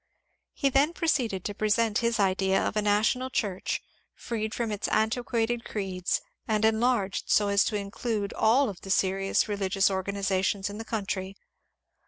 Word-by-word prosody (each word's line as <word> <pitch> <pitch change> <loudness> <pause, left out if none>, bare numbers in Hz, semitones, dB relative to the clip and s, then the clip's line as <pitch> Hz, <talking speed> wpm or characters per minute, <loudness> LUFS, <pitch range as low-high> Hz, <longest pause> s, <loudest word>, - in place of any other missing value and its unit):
He 275 - +1
then 280 +5 +3
proceeded 250 - 0
to 205 - -2
present 215 +1 +1
his 235 -1 0
idea 190 0 +2
of - - -1
a 215 - +2
national 215 +5 +1
Church 200 -7 -2 0.3
freed 220 -2 -3
from 235 -2 -2
its 205 - -2
antiquated 235 +1 0
creeds 190 -4 -2 0.3
and 215 0 +2
enlarged 220 -3 +1
so 205 -1 +3
as 200 0 +4
to 215 - -1
include 205 +1 -3
all 255 +5 +3
of 195 -5 -7
the 195 - -10
serious 195 +2 +1
religious 195 -1 +1
or 190 0 0
ganizations 195 0 -1
in 205 - -8
the 225 - -6
country. 195 -3 -3
210 Hz, 160 wpm, -27 LUFS, 195-230 Hz, 0.3 s, as